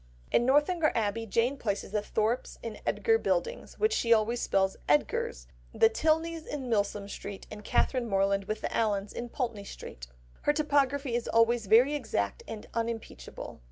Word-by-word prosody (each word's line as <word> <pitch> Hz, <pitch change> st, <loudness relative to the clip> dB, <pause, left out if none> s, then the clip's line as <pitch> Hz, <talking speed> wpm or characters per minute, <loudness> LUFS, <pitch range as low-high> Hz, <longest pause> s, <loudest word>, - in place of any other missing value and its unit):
In 240 Hz, -, +3 dB
Northanger 305 Hz, +4 st, +3 dB
Abbey, 225 Hz, +1 st, -1 dB
Jane 235 Hz, +6 st, +1 dB
places 205 Hz, -6 st, -3 dB
the 210 Hz, 0 st, 0 dB
Thorpes 220 Hz, +4 st, -1 dB
in 225 Hz, -2 st, -6 dB
Edgar 450 Hz, 0 st, +2 dB
Buildings, -, -, -2 dB
which 435 Hz, +1 st, +2 dB
she 235 Hz, -, 0 dB
always 230 Hz, +1 st, +3 dB
spells 190 Hz, 0 st, +1 dB
"Edgar's," 145 Hz, -, +1 dB, 0.3 s
the 225 Hz, -, +6 dB
Tilneys 320 Hz, +4 st, 0 dB
in 275 Hz, -3 st, -4 dB
Milsom 205 Hz, -2 st, 0 dB
Street, 200 Hz, -1 st, -7 dB
and 210 Hz, 0 st, -8 dB
Catherine 245 Hz, +2 st, +1 dB
Morland 195 Hz, 0 st, +1 dB
with 215 Hz, +2 st, -3 dB
the -, -, -3 dB
Allens 205 Hz, -2 st, 0 dB
in 240 Hz, 0 st, -5 dB
Pulteney 235 Hz, -5 st, -3 dB
Street. 60 Hz, -, -9 dB, 0.3 s
Her 295 Hz, -, +2 dB
topography 285 Hz, -3 st, +1 dB
is 240 Hz, 0 st, -1 dB
always 230 Hz, -1 st, +3 dB
very 240 Hz, +8 st, +6 dB
exact 220 Hz, -, -2 dB
and 215 Hz, -2 st, -7 dB
unimpeachable. 230 Hz, -, -5 dB
230 Hz, 160 wpm, -29 LUFS, 205-275 Hz, 0.3 s, the